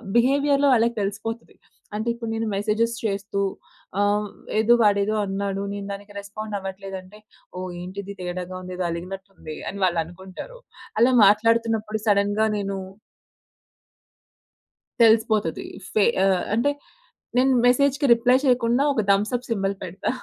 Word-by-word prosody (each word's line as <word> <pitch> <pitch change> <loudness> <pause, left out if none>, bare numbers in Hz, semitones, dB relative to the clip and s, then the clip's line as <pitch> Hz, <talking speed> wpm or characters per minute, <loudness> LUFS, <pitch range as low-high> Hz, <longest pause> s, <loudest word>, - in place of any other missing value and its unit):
బిహేవియర్‌లో 280 +3 +3
వాళ్ళకి 235 0 +2
తెలిసిపోతది. 220 +4 -4 0.4
అంటే 220 +2 -3
ఇప్పుడు 235 -1 -6
నేను 225 0 -2
మెసేజెస్ 215 +3 0
చేస్తూ, 200 0 -2 0.6
ఆహ్, 205 +1 +2 0.3
ఏదో 225 +2 +5
వాడేదో 205 0 +3
అన్నాడు. 195 0 -2
నేను 200 -1 -5
దానికి 205 +1 -8
రెస్పాండ్ 210 +1 -6
అవ్వట్లేదు 195 0 -7
అంటే, 185 +3 -16 0.4
ఓహ్! 185 0 -4
ఏంటి 185 +3 -7
ఇది 200 +1 -8
తేడాగా 180 0 -5
ఉంది. 185 0 -7
ఏదో 180 - -1
అలిగినట్టు 185 +3 -6
ఉంది. 155 -1 -8
అని 200 - -7
వాళ్ళు 170 -2 +1
అనుకుంటారు. 190 - -10 0.4
అలా 245 +3 +5
మాట్లాడుతున్నప్పుడు 220 +1 +2
సడెన్‌గా 205 +1 +3
నేను 200 -1 -3 2.3
తెలిసిపోతది 220 -6 +3 0.3
ఫె 215 - +4 0.2
ఆహ్, 190 -2 +2
అంటే, 240 +6 +2 0.7
నేను 260 +1 +4
మెసేజ్‌కి 280 +3 +3
రిప్లై 245 +2 +4
చేయకుండా 245 0 +3
ఒక 235 - +1
థంబ్ 200 +2 +3
సప్ 245 0 -2
సింబల్ 200 -3 0
పెడతా. 185 +3 -4
205 Hz, 135 wpm, -24 LUFS, 195-230 Hz, 2.3 s, ఏదో